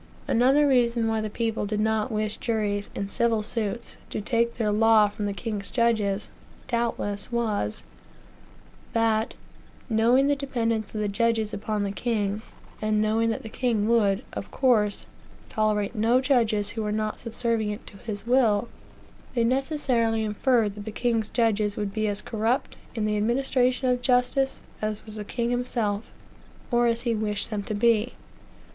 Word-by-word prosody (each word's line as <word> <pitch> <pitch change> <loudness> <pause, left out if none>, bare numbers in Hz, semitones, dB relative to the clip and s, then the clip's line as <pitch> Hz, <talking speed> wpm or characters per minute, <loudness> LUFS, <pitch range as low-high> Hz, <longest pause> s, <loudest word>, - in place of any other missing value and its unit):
Another 270 +5 +4
reason 240 -3 +3
why 220 -1 0
the 215 - -3
people 225 -1 -2
did 210 0 -2
not 220 0 +1
wish 215 0 -1
juries, 210 -3 -1
in 200 - -2
civil 225 +1 +1
suits, 225 +1 -2
to - - -3
take 235 +2 0
their 215 -3 0
law 220 0 +5
from 205 0 -4
the - - -1
king's 205 -1 -4
judges, 220 -4 +1 0.4
doubtless 230 -4 -1
was, 215 - -1 1.1
that, 225 -1 +1 0.6
knowing 235 +5 +4
the 285 0 +3
dependence 230 -6 -2
of 215 - -1
the 210 - 0
judges 220 +1 0
upon 210 0 -2
the 200 - -1
king, 210 -2 -1 0.4
and 215 0 +1
knowing 220 +2 +2
that 225 - -2
the - - -6
king 220 -2 0
would, 220 -2 +3
of - - -5
course, 220 -6 +2 0.4
tolerate 215 -2 0
no 230 +3 +3
judges 225 -6 +2
who 225 - -4
were 210 -1 -1
not 215 0 -2
subservient 225 -2 -2
to 200 - -12
his 205 0 -6
will, 235 -3 +3 0.7
they 235 - +3
necessarily 250 -3 +1
inferred; 215 0 +1
that 205 0 -9
the 220 - -4
king's 225 -1 0
judges 215 -3 +1
would 205 -1 -2
be 215 0 0
as 205 -1 -1
corrupt, 225 +3 -1 0.2
in 220 -2 -1
the 210 0 0
administration 250 +3 +1
of 250 -1 +1
justice, 250 +2 +1 0.2
as 215 0 -3
was 215 -1 -8
the 210 - -4
king 235 +3 -2
himself, 235 -4 -1 0.6
or 240 0 +3
as 235 0 0
he 235 -2 +1
wished 210 -1 -2
them 210 -1 -1
to 210 +1 -4
be. 230 +2 +2
220 Hz, 165 wpm, -26 LUFS, 210-235 Hz, 1.1 s, law